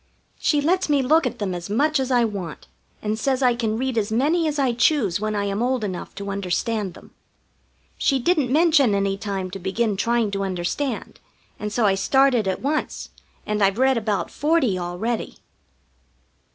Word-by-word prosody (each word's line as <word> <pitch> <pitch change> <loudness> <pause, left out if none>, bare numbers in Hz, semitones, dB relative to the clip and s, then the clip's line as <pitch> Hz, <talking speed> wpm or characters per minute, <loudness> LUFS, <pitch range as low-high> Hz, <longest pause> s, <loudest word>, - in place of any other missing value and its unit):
She 295 -2 +2
lets 360 +3 +1
me 285 -2 +3
look 305 +2 +3
at - - -5
them 200 -3 -2
as 175 +1 -6
much 290 +8 +2
as 265 -1 -1
I 245 -2 +3
want, 195 -7 -6 0.4
and 215 +1 -1
says 265 +2 0
I 250 -1 +4
can 225 -2 -1
read 255 -1 0
as 210 0 -3
many 310 +8 +2
as 300 -1 -2
I 265 -4 +2
choose 235 - +2
when 215 0 -2
I 205 - 0
am 200 +2 -2
old 250 -1 0
enough 185 -4 -5
to 200 0 -5
understand 200 +1 -2
them. - - -15 0.9
She 275 - +2
didn't 280 -1 +1
mention 300 -7 +4
any 195 0 0
time 195 -2 -4
to 195 - -6
begin 200 +4 -1
trying 230 +1 +1
to 195 0 -2
understand, 195 +8 -3 0.4
and 210 0 -4
so 230 +1 +1
I 195 - +4
started 245 +3 +3
at 190 - -2
once, 300 +3 -2 0.4
and 210 0 -1
I've 195 +1 +2
read 265 +1 +3
about 215 -3 -1
forty 295 - +1
already. 180 +7 -3
230 Hz, 185 wpm, -23 LUFS, 200-270 Hz, 0.9 s, I